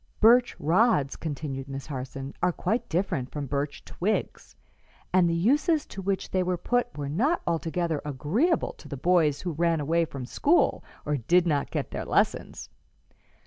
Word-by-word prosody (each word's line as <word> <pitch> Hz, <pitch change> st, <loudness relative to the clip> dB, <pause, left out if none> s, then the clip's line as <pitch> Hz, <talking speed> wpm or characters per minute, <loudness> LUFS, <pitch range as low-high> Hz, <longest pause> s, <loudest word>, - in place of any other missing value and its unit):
"Birch 240 Hz, +3 st, +5 dB
rods," 170 Hz, -, +2 dB
continued 140 Hz, -3 st, -5 dB
Miss 135 Hz, 0 st, -6 dB
Harson, 135 Hz, -1 st, -6 dB
"are 180 Hz, -, +3 dB
quite 230 Hz, +7 st, -2 dB
different 160 Hz, -7 st, -1 dB
from 145 Hz, -1 st, -4 dB
birch 140 Hz, +1 st, -3 dB
twigs, 210 Hz, +5 st, -3 dB, 0.6 s
and 180 Hz, -2 st, +4 dB
the 165 Hz, -, +1 dB
uses 290 Hz, -, +2 dB
to 195 Hz, -, -8 dB
which 195 Hz, 0 st, -2 dB
they 185 Hz, -, +1 dB
were 180 Hz, 0 st, 0 dB
put 245 Hz, +8 st, 0 dB
were 145 Hz, -1 st, -3 dB
not 250 Hz, -, +1 dB
altogether 165 Hz, -1 st, -1 dB
agreeable 160 Hz, -, 0 dB
to -, -, -12 dB
the 140 Hz, -, -6 dB
boys 160 Hz, -1 st, +2 dB
who 180 Hz, -, -3 dB
ran 165 Hz, +1 st, +1 dB
away 165 Hz, +3 st, +1 dB
from 135 Hz, -5 st, -7 dB
school 300 Hz, -, +2 dB, 0.2 s
or 150 Hz, 0 st, 0 dB
did 170 Hz, +9 st, +3 dB
not 145 Hz, -4 st, 0 dB
get -, -, -3 dB
their -, -, -4 dB
lessons. -, -, 0 dB
170 Hz, 165 wpm, -27 LUFS, 145-195 Hz, 0.6 s, Birch